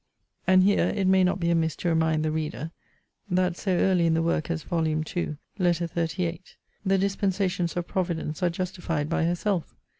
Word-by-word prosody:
And 185 0 +6
here 200 +1 +3
it 195 - 0
may 190 0 +5
not 180 +1 +1
be 170 -1 +1
amiss 165 -2 +1
to 175 - -2
remind 160 -1 +2
the 155 - 0
reader, 155 0 -3 0.6
that 180 -1 +1
so 190 +1 -1
early 180 -1 +3
in 160 - +3
the 165 - +1
work 165 -2 0
as 165 -2 -2
Vol. 165 -3 0
II. 155 0 -2 0.2
Letter 175 -2 +2
XXXVIII. 165 0 -2 0.4
the 195 -1 +2
dispensations 190 -3 0
of 175 - -1
Providence 170 -4 -2
are 180 - +3
justified 170 -4 -3
by 170 0 +1
herself. 175 +1 -1
170 Hz, 180 wpm, -26 LUFS, 160-185 Hz, 0.6 s, And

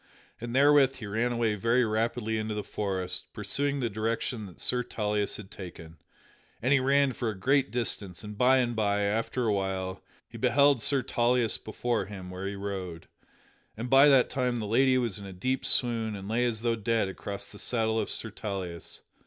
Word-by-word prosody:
And 120 +1 -5
therewith 140 -1 +5
he 115 - -8
ran 115 +4 0
away 115 -2 +1
very 115 +4 +2
rapidly 110 0 -1
into 110 0 -3
the 105 - -3
forest, 95 -3 -3
pursuing 140 0 -1
the 120 - +1
direction 110 +1 -2
that 90 - -15
Sir 125 0 +2
Tauleas 105 -3 -1
had 100 -2 -11
taken. 85 -3 -10 0.6
And 130 +4 +2
he 140 - +5
ran 140 0 +3
for 120 -1 -2
a 105 - -5
great 135 +5 +2
distance, 100 -7 -2
and 105 0 -7
by 125 +4 +4
and 120 -2 0
by, 105 -2 +1
after 115 +4 -1
a 110 - +2
while, 95 -1 -3 0.2
he - - -11
beheld 140 -2 +4
Sir 135 +2 +1
Tauleas 120 -1 +2
before 110 -1 -2
him 95 -3 -8
where 95 +1 -5
he 100 - -4
rode. 95 -4 -6 0.7
And 120 +3 -5
by 135 +2 +8
that 135 -3 +5
time 125 -2 0
the 110 - -3
lady 130 +5 +3
was 115 -5 -1
in 100 - -9
a 95 - -8
deep 130 +9 -2
swoon 115 -3 +2
and 100 -1 -8
lay 115 +3 +1
as 115 -2 -2
though 115 -1 +2
dead 115 -1 0
across 100 +1 -6
the 105 - -12
saddle 110 -2 0
of - - -2
Sir 115 - -2
Tauleas. 95 -6 -6
110 Hz, 195 wpm, -28 LUFS, 100-125 Hz, 0.7 s, by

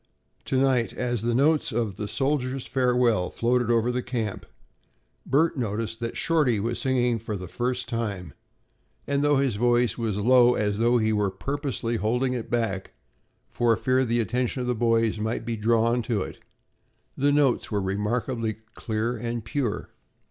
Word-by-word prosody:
To 130 - 0
night, 130 -4 +2
as 120 -3 -2
the 120 +1 0
notes 150 +4 +3
of 110 -4 -1
"The 105 - -4
Soldier's 135 +2 -1
Farewell" 125 -7 +2
floated 120 0 0
over 120 +1 +2
the 125 +1 -1
camp, 115 -5 -4 0.8
Bert 150 +4 +2
noticed 115 0 -2
that 115 0 -4
Shorty 150 -10 +2
was 115 +3 -2
singing 125 -3 +1
for 110 -1 -5
the 90 -2 -6
first 125 +6 -2
time, 100 - -4 0.7
and 140 0 0
though 145 0 +4
his 135 -6 +1
voice 120 -1 +2
was 110 -4 -1
low 125 +3 +5
as 105 0 -1
though 120 +2 +3
he 110 -1 +1
were 105 -2 +1
purposely 125 +2 -3
holding 125 +4 0
it 120 -3 -5
back, 110 -5 -2 0.5
for 115 -2 +1
fear 130 0 +2
the 120 -1 0
attention 125 +3 -1
of 125 - -3
the 125 - +1
boys 115 -2 +1
might 110 +1 -2
be 115 -1 -2
drawn 115 +2 +2
to 110 -4 -1
it, - - -9 0.8
the 145 +2 +2
notes 145 -3 +2
were 105 - 0
remarkably 110 +4 -1 0.2
clear 110 +2 -2
and 115 -1 -4
pure. 120 -2 -3
120 Hz, 165 wpm, -25 LUFS, 110-125 Hz, 0.8 s, low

